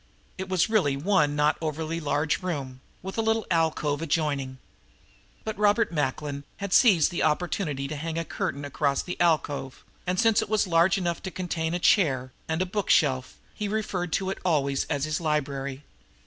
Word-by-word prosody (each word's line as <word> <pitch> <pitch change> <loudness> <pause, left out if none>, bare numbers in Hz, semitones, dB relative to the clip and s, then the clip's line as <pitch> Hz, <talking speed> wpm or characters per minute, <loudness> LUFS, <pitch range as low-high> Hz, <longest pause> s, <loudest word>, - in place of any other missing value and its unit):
It 190 0 -4
was 185 -2 +2
really 185 -11 +2
one 150 -2 +2
not 150 +1 +2
overly 160 +1 -2
large 150 +1 0
room, 140 -8 -4 0.2
with 190 +4 -4
a - - +4
little 225 -1 +1
alcove 160 -3 +1
adjoining; 145 -4 -1 0.9
but 220 -1 -4
Robert 210 +1 +3
Macklin 145 -1 -2
had 200 -2 -3
seized 195 - +5
the 175 - -2
opportunity 150 -3 0
to 155 - -5
hang 160 +2 -4
a 165 - -1
curtain 145 -2 -3
across 140 0 0
the 180 - -5
alcove, 145 -5 0 0.2
and, 180 0 0
since 225 -2 +4
it - - -5
was 215 -1 +2
large 170 +1 +3
enough 170 -3 -2
to 190 - -4
contain 170 -3 -2
a - - +1
chair 135 -10 +3 0.2
and 160 +3 0
a - - -3
bookshelf, 150 -9 +1 0.2
he 210 - -3
referred 200 -5 -2
to 190 -1 0
it - - -5
always 140 -6 +1
as 140 0 -1
his 155 +2 -2
"library." 140 -3 -2
160 Hz, 175 wpm, -26 LUFS, 145-185 Hz, 0.9 s, seized